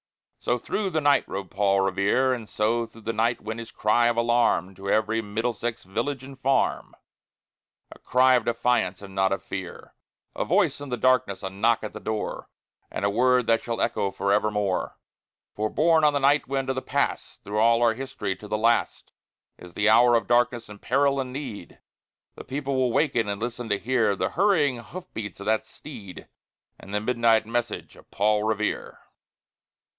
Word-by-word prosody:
So 120 - 0
through 195 - -2
the 160 -3 -1
night 145 -1 +3
rode 95 -2 -6
Paul 100 -1 +2
Revere; 100 +7 +2
And 115 -4 -6
so 115 +2 0
through 115 0 -16
the 115 +1 -3
night 115 +2 0
went 110 +2 -5
his 115 -1 -8
cry 120 +3 +2
of 120 0 0
alarm 115 -6 +2
To 100 +1 -7
every 110 +2 +1
Middlesex 115 +2 -3
village 120 +8 -3
and 135 0 -11
farm, 135 0 0 1.0
A - - -13
cry 130 +1 +4
of 125 -3 +2
defiance 115 -5 0
and 95 -1 -10
not 95 0 +1
of 95 - -2
fear, 95 -2 -7 0.4
A - - -1
voice 170 -6 +1
in 145 - -7
the 125 - -2
darkness, 115 -6 +1
a 95 - -4
knock 110 +4 +1
at 105 - -5
the - - -7
door, 110 -1 -4 0.4
And - - -3
a - - +3
word 125 +3 +3
that 115 0 +2
shall 115 -1 -4
echo 100 - 0
forevermore! 100 -1 0 0.6
For, 110 +1 -2
borne 160 +3 +3
on 150 -1 +5
the 145 - +1
night 140 +2 +3
wind 135 0 -2
of 130 - 0
the 130 - -2
Past, - - -2
Through 105 +1 -3
all 115 +1 +4
our 115 -1 +4
history, 110 -6 -4
to 105 - -11
the 105 - -1
last, 115 +2 0 0.5
In 90 - -11
the 105 +4 0
hour 120 +2 +6
of 115 - +1
darkness 120 -1 +1
and 105 -1 -12
peril 140 +2 +2
and 130 -1 -3
need, 125 -10 -7 0.5
The - - -10
people 140 0 -3
will 130 -2 +1
waken 120 -6 +1
and 100 0 -3
listen 120 0 -4
to 100 - +2
hear 110 -3 +1
The - - -1
hurrying 160 -10 +2
hoof 180 +9 -9
beats 105 -5 -6
of 100 - -8
that 110 +1 0
steed, 110 -11 -11 0.5
And 95 - -12
the - - +2
midnight 115 -1 +2
message 115 0 -3
of - - -19
Paul 105 +1 +1
Revere. 110 -1 -2
115 Hz, 190 wpm, -25 LUFS, 105-130 Hz, 1.0 s, hour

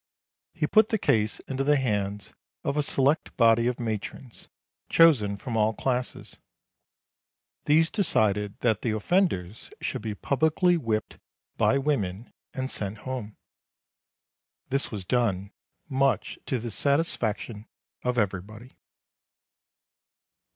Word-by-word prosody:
He - - 0
put 215 0 +4
the 220 - +1
case 110 - +1
into 135 0 -3
the 145 +1 +4
hands 105 -6 -2 0.3
of 140 - -1
a 150 - +2
select 140 +1 0
body 115 0 +5
of 125 - -1
matrons, 115 +2 -5 0.4
chosen 120 -12 +5
from 115 +3 -5
all 110 0 +2
classes. 125 +1 -3 1.3
These 160 +2 +4
decided 105 - +1
that 115 -4 +2
the 110 -3 0
offenders 110 - 0
should - - -3
be 110 -2 -4
publicly 160 - +2
whipped 115 -9 -2 0.4
by 135 - +3
women, 115 -8 -2 0.2
and 130 0 -3
sent 100 +1 -3
home. 125 -5 -5 1.3
This 135 +1 0
was 100 -4 -6
done, 100 -3 0 0.4
much 135 -1 0
to 130 - 0
the 120 0 -5
satisfaction 115 -6 -1 0.3
of 125 0 -1
everybody. 105 +4 -3
120 Hz, 115 wpm, -27 LUFS, 105-140 Hz, 1.3 s, body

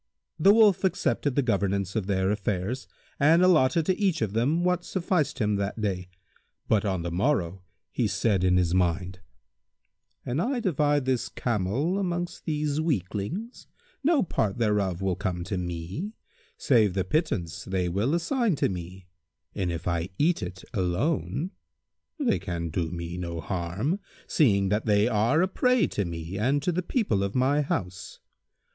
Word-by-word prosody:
The 195 +6 +7
Wolf 210 -4 +5
accepted 145 -7 0
the 140 - +2
governance 100 -4 0
of 105 -4 -1
their 95 -1 +1
affairs 105 +4 -2 0.3
and 160 +5 +5
allotted 160 -3 +4
to 185 +2 0
each 185 - +1
of 105 -2 -2
them 140 +10 +1
what 180 -1 +1
sufficed 175 -7 -1
him 105 -4 +1
that 100 +3 -3
day; 95 -4 -2 0.6
but 105 -2 +3
on 95 -5 -1
the 85 - -3
morrow 95 - 0 0.3
he 115 - 0
said 100 -3 +1
in 90 0 +4
his 90 -2 +2
mind, 90 0 0 1.1
"An 125 +5 -1
I 250 +7 0
divide 145 - +1
this 130 -2 0
camel 120 - -1
amongst 175 -2 -3
these 150 -1 -1
weaklings, 150 - -3 0.4
no 305 -1 +4
part 110 - -1
thereof 100 -5 0
will 95 -2 +1
come 90 -3 -3
to 95 +3 -3
me, 90 - -4 0.4
save 110 -8 +3
the 95 - +1
pittance 95 - -1
they 95 -1 -1
will 105 - 0
assign 225 - +1
to - - +1
me, 90 0 -7 0.5
and 95 -3 -1
if 85 0 -5
I 85 0 -1
eat 170 +4 +2
it 95 -1 -6
alone, 100 - -1 0.7
they 250 -6 +1
can 85 -4 -4
do 80 0 -2
me 85 +1 -5
no 85 -2 -4
harm, 95 - -2 0.3
seeing 100 - +3
that 105 +3 0
they 105 +1 +4
are 120 - +2
a - - +2
prey 250 +2 +2
to 100 - -1
me 85 +2 -5
and 135 +6 +1
to 180 - +1
the 180 +2 -1
people 180 - 0
of 100 +1 -2
my 135 +3 +3
house. 90 -9 -4
105 Hz, 165 wpm, -27 LUFS, -, 1.1 s, The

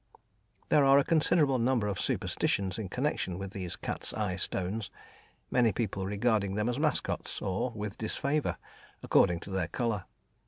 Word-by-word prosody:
There 150 - +5
are 135 0 +7
a 140 - +5
considerable 150 -4 +3
number 120 -2 +2
of 100 - -2
superstitions 95 +2 0
in 100 -4 -4
connection 125 -6 -1
with 95 0 -5
these 95 -4 -4
cat's - - -4
eye 100 -3 -1
stones, 95 +3 -2 0.6
many 120 -3 +4
people 100 -2 -2
regarding 105 -1 +1
them 105 +2 0
as 125 +3 -2
mascots, 150 -1 -1
or 95 +6 -1
with 105 -1 -5
disfavour, 140 +6 0 0.5
according 85 -1 +3
to 100 - -8
their 95 -3 0
colour. 110 0 -2
105 Hz, 155 wpm, -30 LUFS, 95-130 Hz, 0.6 s, are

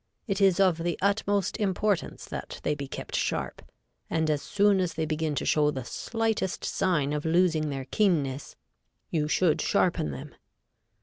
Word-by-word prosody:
It 200 -2 -2
is 195 -1 +4
of 185 -4 +4
the 170 0 -1
utmost 200 -1 +1
importance 205 -2 -1
that - - -7
they 150 - +1
be 140 -1 -5
kept - - -6
sharp, - - -2 0.5
and 160 -1 +1
as 145 -1 0
soon 205 +2 +3
as 180 -2 -1
they 160 - -1
begin 155 -1 -1
to - - -2
show 150 -1 +3
the 130 -4 -4
slightest 225 - -2
sign 150 -7 +1
of 150 0 -2
losing 160 -2 +2
their 135 -2 -4
keenness, 145 -7 0 0.6
you 150 -2 0
should 160 0 +2
sharpen 175 - +1
them. 70 -2 -7
165 Hz, 165 wpm, -27 LUFS, 150-195 Hz, 0.6 s, is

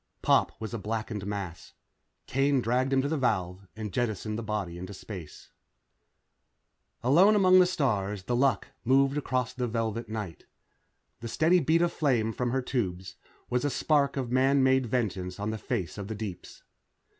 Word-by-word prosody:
Pop - - +2
was 110 0 -6
a 115 - -3
blackened 110 -1 -4
mass. 95 -5 -6 0.5
Kane 135 +1 +2
dragged 125 +3 0
him 135 -1 +3
to - - 0
the 155 0 -1
valve 95 -6 -1
and 110 -3 -6
jettisoned 110 -3 -2
the 115 - -3
body 105 -6 -3
into 95 +2 -7
space. 90 -6 -10 1.5
Alone 175 - +5
among 185 -2 +6
the 180 - +6
stars, 105 - -1
The 120 - -1
Luck 135 +2 +1
moved 135 +3 +3
across 130 -4 -1
the 125 -1 -2
velvet 115 0 -2
night. 105 -6 -6 0.7
The 115 - -6
steady 165 +9 +3
beat 165 +1 +3
of 175 - 0
flame 120 -7 +1
from 125 +1 -1
her 130 +1 -1
tubes 95 -8 -3 0.3
was 125 0 0
a 145 - +1
tiny 130 - -4
spark 140 -3 +2
of 125 -3 -3
man 135 +2 +3
made 130 -1 +3
vengeance 95 -6 -2
on 105 +1 -2
the 110 - -5
face 100 -7 -3
of 100 - -5
the 110 - -4
deeps. 100 -4 -8
115 Hz, 175 wpm, -28 LUFS, 105-135 Hz, 1.5 s, among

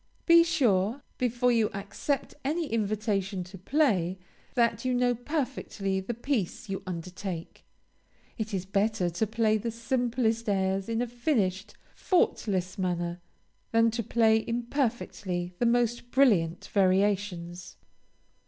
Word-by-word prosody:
Be 335 -1 +8
sure, 240 - +1 0.2
before 245 0 +2
you 225 -3 +3
accept 205 +8 -3
any 320 +5 0
invitation 210 -4 -1
to 180 +3 -12
play, 190 - +1 0.4
that 235 -2 +2
you 255 -1 +1
know 245 0 +3
perfectly 245 -7 -2
the 205 +5 -4
piece 235 -3 -2
you 195 - -3
undertake. 180 0 -6 0.7
It 220 0 -4
is 190 -2 -2
better 195 -2 +1
to 195 +6 -1
play 220 0 +2
the 230 - -3
simplest 230 -1 0
airs 195 0 0
in 230 +1 0
a - - -3
finished, 220 - -1 0.2
faultless 195 - 0
manner, 175 -1 -2 0.5
than 230 0 +4
to 230 +1 -2
play 220 0 +3
imperfectly 230 -7 -2
the 240 - +3
most 240 0 +1
brilliant 200 -12 +3
variations. 185 -3 +1
220 Hz, 125 wpm, -28 LUFS, 190-240 Hz, 0.7 s, Be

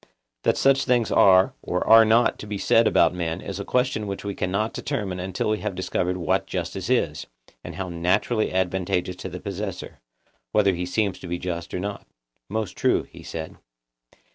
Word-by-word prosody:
That - - +1
such 135 0 +3
things 120 -3 +2
are 95 -1 +5
or - - -2
are 115 0 +8
not 115 +2 +3
to 105 - -8
be 105 -1 -3
said 115 +3 +4
about - - +4
men 85 -1 -3
is 100 0 -6
a - - -3
question 125 -3 0
which 100 0 -5
we 100 - -2
cannot 100 +4 -1
determine 105 -10 -3
until 95 +3 -2
we 110 - 0
have 95 - -4
discovered 90 0 -1
what 85 -3 0
justice - - -4
is, - - 0 0.4
and - - -8
how 95 -1 -4
naturally 90 +6 0
advantageous 90 -1 -1
to 95 - -6
the 90 +1 -7
possessor, 100 0 -6 0.5
whether 100 -2 +4
he 90 0 -3
seem 100 +1 0
to - - -10
be 85 0 -2
just 85 -1 -5
or - - -3
not. 100 +2 -5 0.4
Most 110 -1 -3
true, - - +2
he - - -14
said. 80 -1 -7
95 Hz, 190 wpm, -24 LUFS, 90-110 Hz, 0.5 s, are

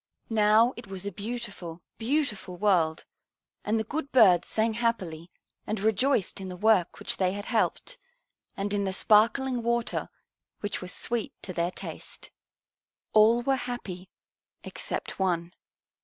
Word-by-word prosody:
Now 220 +3 +5
it 235 -3 -9
was 195 0 -6
a 200 - -2
beautiful, 205 -6 -6 0.2
beautiful 225 -8 -1
world, 175 -5 +2 0.6
and 220 +2 +1
the - - 0
good 280 +5 -4
birds 195 -9 +6
sang 220 +1 +1
happily 185 -8 -2 0.4
and 215 -1 -1
rejoiced 220 0 +1
in 190 - -6
the 180 - -7
work 205 -3 +3
which - - -4
they 185 -1 +1
had 205 +1 -5
helped, 250 - -1 0.6
and 200 +1 -1
in 200 -1 +1
the 190 -1 -1
sparkling 235 +5 +3
water 235 0 -1 0.5
which 205 -1 -3
was 180 0 -5
sweet 235 -2 -1
to 185 - -5
their 170 0 0
taste. - - -8 0.8
All 225 +3 +5
were 270 +1 +2
happy 190 -6 -6 0.5
except - - -5
one. 175 -2 0
210 Hz, 140 wpm, -28 LUFS, 185-235 Hz, 0.8 s, birds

